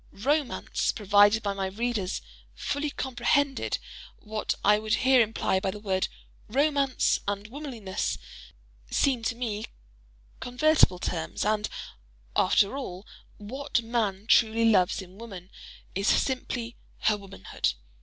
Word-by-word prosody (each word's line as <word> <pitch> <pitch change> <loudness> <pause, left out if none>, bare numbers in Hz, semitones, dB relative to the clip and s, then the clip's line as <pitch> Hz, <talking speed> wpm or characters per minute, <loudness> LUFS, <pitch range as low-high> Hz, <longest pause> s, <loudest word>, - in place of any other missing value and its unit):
"Romance," 285 +6 0
provided 205 +1 +4
my 195 -1 -1
readers 205 - -2 0.3
fully 285 - -2
comprehended 270 +1 0 0.4
what 215 0 -3
I 210 +1 +6
would 215 0 +1
here 260 -1 +5
imply 215 -3 +1
by 190 - -1
the 210 - -5
word—"romance" 260 +8 0
and 200 0 -2
"womanliness" 235 -6 -4 0.7
seem 265 -4 +2
to 230 +1 -1
me 225 -3 -3 0.7
convertible 250 - +3
terms: 170 0 -3
and, 215 0 +1 0.7
after 200 +5 +3
all, 195 -8 -6 0.3
what 235 +3 -2
man 215 -4 -1
truly 230 0 +4
loves 190 -3 +3
in 185 +2 -15
woman, 195 -5 -9 0.4
is 195 +2 -1
simply 245 -3 0 0.2
her 215 - +3
womanhood. 195 - -3
220 Hz, 115 wpm, -27 LUFS, 200-250 Hz, 0.7 s, I